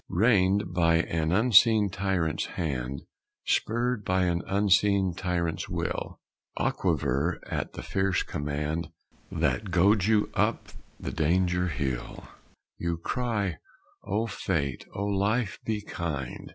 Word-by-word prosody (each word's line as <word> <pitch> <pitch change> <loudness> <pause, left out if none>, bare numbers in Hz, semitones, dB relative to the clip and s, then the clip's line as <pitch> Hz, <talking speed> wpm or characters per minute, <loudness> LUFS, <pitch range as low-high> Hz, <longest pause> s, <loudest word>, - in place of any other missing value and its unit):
Reined 95 -2 +3
by 85 -2 +3
an 80 -1 0
unseen 110 0 +5
tyrant's 90 -5 -1
hand, 70 -4 -3 0.4
Spurred 120 0 0
by 95 -1 +1
an 85 -1 +1
unseen 100 -1 +3
tyrant's 85 -2 -2
will, - - -3 0.4
Aquiver 70 +8 0
at - - -4
the - - -7
fierce 95 -1 0
command 75 +3 -3 0.4
That 105 - 0
goads 95 +3 +3
you 110 -2 +2
up - - 0 0.3
the - - -4
danger 90 +3 +1
hill, 65 -5 -3 0.6
You 85 -1 -1
cry: 105 -1 -2 0.5
"O 105 +4 -1
Fate, 80 - -2
O 100 - -3
Life, 100 +2 0
be 110 -2 -1
kind! 75 -10 -5
90 Hz, 115 wpm, -28 LUFS, 80-105 Hz, 0.6 s, unseen